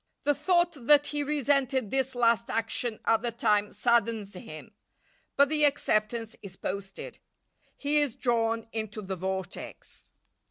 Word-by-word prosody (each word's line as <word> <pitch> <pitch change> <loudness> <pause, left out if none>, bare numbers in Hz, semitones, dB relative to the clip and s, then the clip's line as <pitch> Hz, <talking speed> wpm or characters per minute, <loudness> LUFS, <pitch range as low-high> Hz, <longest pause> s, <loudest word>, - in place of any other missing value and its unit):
The 290 - +3
thought 345 -6 0
that 295 -1 +6
he 295 0 -2
resented 275 -5 +1
this 265 -1 0
last 230 -1 +2
action 225 0 -2
at 225 -1 +3
the 240 - -1
time 210 -2 +1
saddens 230 -3 +1
him, 155 -4 -10 0.6
but 280 0 +5
the 300 +1 +1
acceptance 230 -5 +1
is 195 -3 -10
posted. 195 0 -6 0.6
He 295 +1 +1
is 290 -6 0
drawn 230 -2 0
into 220 -1 -4
the 190 0 -4
vortex. 190 0 -6
230 Hz, 135 wpm, -28 LUFS, 215-280 Hz, 0.6 s, that